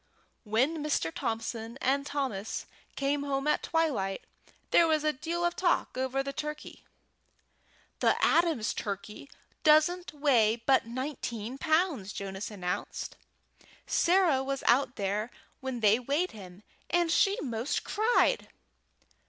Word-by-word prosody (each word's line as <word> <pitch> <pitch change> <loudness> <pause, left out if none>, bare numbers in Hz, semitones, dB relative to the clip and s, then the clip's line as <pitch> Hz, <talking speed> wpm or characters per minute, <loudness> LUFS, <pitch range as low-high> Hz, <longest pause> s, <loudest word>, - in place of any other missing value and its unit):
When 265 +9 +1
Mr. 285 - 0
Thompson 225 +1 -4
and 280 +2 +1
Thomas 255 -9 -3 0.3
came 280 +1 0
home 275 -1 -2
at 300 - +2
twilight 270 -13 0 0.5
there 335 - +6
was 310 -1 +2
a 305 0 +2
deal 335 +5 -2
of 345 - 0
talk 360 -2 +1
over 260 +1 -1
the 275 0 -5
turkey. 300 +1 -6 1.2
"The - - +3
Adams' 325 -10 +2
turkey 205 +6 -6 0.3
doesn't 310 +4 +4
weigh 260 -7 +3
but 240 +1 +2
nineteen 250 -2 -5
pounds," 315 - +1
Jonas 195 0 -5
announced. 180 -4 -4 0.7
"Sarah 345 -6 +3
was 275 0 -3
out 260 +1 +3
there 205 +2 -2 0.3
when 260 -3 -4
they 215 +2 +5
weighed 285 +9 0
him, 190 -2 -12 0.3
and 345 -1 +2
she 395 +5 +3
'most 250 +1 -2
cried." 440 +4 +2
270 Hz, 125 wpm, -29 LUFS, 225-310 Hz, 1.2 s, there